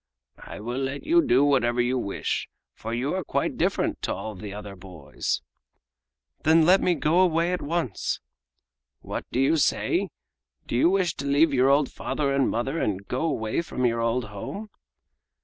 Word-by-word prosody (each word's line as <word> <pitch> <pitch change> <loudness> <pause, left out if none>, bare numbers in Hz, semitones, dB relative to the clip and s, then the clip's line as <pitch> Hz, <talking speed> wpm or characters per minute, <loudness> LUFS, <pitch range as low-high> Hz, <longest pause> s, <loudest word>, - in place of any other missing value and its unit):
"I - - -9
will 120 +4 -3
let 135 +1 -3
you 340 +2 +5
do 145 - +3
whatever 125 -4 +2
you 120 +1 +2
wish, 100 -4 -3 0.2
for 115 - -7
you 125 +5 -1
are 185 0 -2
quite - - -1
different - - 0
to - - -1
all 105 -2 -7
other 105 -1 -8
boys!" 90 -6 -4 1.0
"Then 160 +1 +5
let 185 +3 +5
me 180 - +2
go 155 +3 +2
away 170 -1 +3
at 180 - -2
once!" 155 - -2 0.8
"What - - -5
do 125 - -1
you 135 +5 +3
say? 150 - +1 0.6
Do - - -3
you 130 +8 +4
wish 185 -3 +1
to 140 - -5
leave 145 +2 +4
your 130 0 +4
old 140 0 +3
father 140 -2 -2
and 135 -1 +2
mother 135 +7 -1
and 100 -1 -2
go 125 - -2
away 110 -5 -1
from 130 -6 -2
your 115 -1 +1
old 115 +1 0
home?" 195 - -7
135 Hz, 175 wpm, -25 LUFS, 115-165 Hz, 1.0 s, you